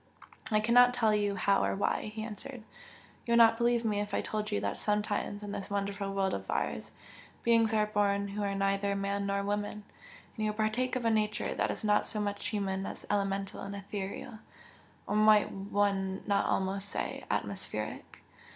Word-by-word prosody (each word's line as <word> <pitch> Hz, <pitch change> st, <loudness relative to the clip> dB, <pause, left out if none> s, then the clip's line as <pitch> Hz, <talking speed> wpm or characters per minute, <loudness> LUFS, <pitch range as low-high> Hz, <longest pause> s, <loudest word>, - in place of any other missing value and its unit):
"I 215 Hz, -, +3 dB
cannot 245 Hz, +3 st, +5 dB
tell 225 Hz, -3 st, +3 dB
you 205 Hz, -1 st, +1 dB
how 195 Hz, +1 st, +2 dB
or -, -, +1 dB
why" 200 Hz, +1 st, 0 dB
he 220 Hz, -, -3 dB
answered 230 Hz, +3 st, -7 dB, 0.6 s
"You 235 Hz, -, +2 dB
would -, -, +6 dB
not 225 Hz, 0 st, +6 dB
believe 235 Hz, 0 st, +2 dB
me 210 Hz, -2 st, +1 dB
if 205 Hz, 0 st, -2 dB
I -, -, +1 dB
told 215 Hz, 0 st, -3 dB
you 205 Hz, -, +1 dB
that -, -, -2 dB
sometimes 210 Hz, 0 st, -1 dB
in 205 Hz, -, -5 dB
this 200 Hz, 0 st, -5 dB
wonderful 200 Hz, 0 st, -2 dB
world 195 Hz, -1 st, 0 dB
of -, -, -5 dB
ours, -, -, -2 dB, 0.5 s
beings 230 Hz, -1 st, +4 dB
are 215 Hz, -1 st, +3 dB
born 200 Hz, -1 st, +1 dB
who 205 Hz, +1 st, -4 dB
are 200 Hz, -1 st, -1 dB
neither 195 Hz, 0 st, +1 dB
man 200 Hz, 0 st, -1 dB
nor 200 Hz, 0 st, 0 dB
woman, 205 Hz, +1 st, -2 dB, 0.5 s
and 215 Hz, -2 st, -1 dB
who 210 Hz, -, 0 dB
partake 220 Hz, +4 st, 0 dB
of 250 Hz, -2 st, -2 dB
a 230 Hz, -, +4 dB
nature 215 Hz, -1 st, 0 dB
that -, -, 0 dB
is -, -, -4 dB
not 210 Hz, -1 st, +3 dB
so 215 Hz, -, -2 dB
much 205 Hz, -1 st, -2 dB
human 195 Hz, -4 st, -2 dB
as -, -, -8 dB
elemental 195 Hz, -1 st, -1 dB
and 200 Hz, 0 st, -5 dB
ethereal 200 Hz, +3 st, -6 dB, 0.7 s
or -, -, -2 dB
might 215 Hz, 0 st, +5 dB
one 195 Hz, -1 st, -1 dB
not 200 Hz, -1 st, +2 dB
almost 195 Hz, +1 st, -1 dB
say, -, -, -3 dB
atmospheric? -, -, -4 dB
205 Hz, 190 wpm, -31 LUFS, 200-215 Hz, 0.7 s, would